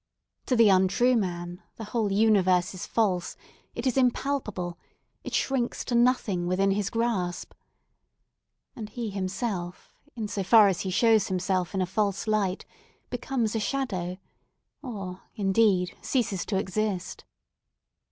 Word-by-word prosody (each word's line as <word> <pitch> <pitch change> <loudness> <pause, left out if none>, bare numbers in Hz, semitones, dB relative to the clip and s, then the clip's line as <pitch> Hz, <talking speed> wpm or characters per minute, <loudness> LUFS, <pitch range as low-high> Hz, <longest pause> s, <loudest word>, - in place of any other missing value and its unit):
To 255 - +2
the 230 -3 +6
untrue 195 +7 +4
man, 175 -3 -3
the 225 - -7
whole 215 -1 -1
universe 195 -4 +3
is 185 - -7
false—it 210 +3 -3
is 255 0 +1
impalpable—it 245 -9 -3
shrinks 260 -3 -1
to 245 - -3
nothing 235 -7 +2
within 195 +2 +2
his 200 0 0
grasp. 225 -7 -2 1.2
And 215 -3 -7
he 225 -1 -5
himself 190 -2 -4 0.2
in 220 -3 -3
so 205 - -3
far 205 +2 +6
as 185 - -1
he 190 - -3
shows 220 +1 +3
himself 185 0 -1
in 190 - +1
a - - 0
false 200 +1 -1
light, 205 -3 0 0.5
becomes 245 -2 -1
a - - +1
shadow, 195 -8 -2 0.6
or, 195 -8 -6
indeed, 195 -2 +2
ceases 210 -9 -1
to 195 - 0
exist. 190 -1 -2
200 Hz, 130 wpm, -27 LUFS, 185-230 Hz, 1.2 s, the